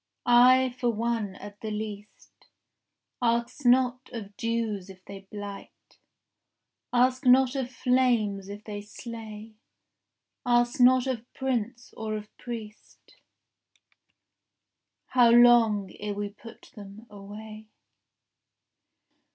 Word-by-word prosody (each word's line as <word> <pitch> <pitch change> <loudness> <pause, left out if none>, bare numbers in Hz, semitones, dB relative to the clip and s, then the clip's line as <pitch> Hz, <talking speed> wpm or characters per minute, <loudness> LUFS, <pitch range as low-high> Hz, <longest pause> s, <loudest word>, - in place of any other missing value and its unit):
I 250 +1 +5
for 245 - +1
one, 225 -3 -2
at 205 +1 -11
the 220 - -4
least, 210 -1 -8 0.7
Ask 235 +3 0
not 250 0 +3
of 205 -4 -8
dews 225 -4 -2
if 185 -1 -14
they 195 -1 -11
blight, 205 -1 -10 0.9
Ask 255 +1 +2
not 255 +1 +5
of 260 -2 -2
flames 240 -7 +1
if 205 +1 -8
they 205 -1 -6
slay, 220 0 -9 0.9
Ask 240 +1 +2
not 255 +1 +5
of 250 -2 -4
prince 250 -2 -3
or 215 -1 -4
of 210 0 -9
priest 220 -3 -10 1.9
How 245 -2 +5
long 230 -5 +5
ere 205 0 -4
we 205 0 -3
put 220 +3 -15
them 205 +1 -12
away. 215 +1 -11
225 Hz, 105 wpm, -27 LUFS, 205-245 Hz, 1.9 s, I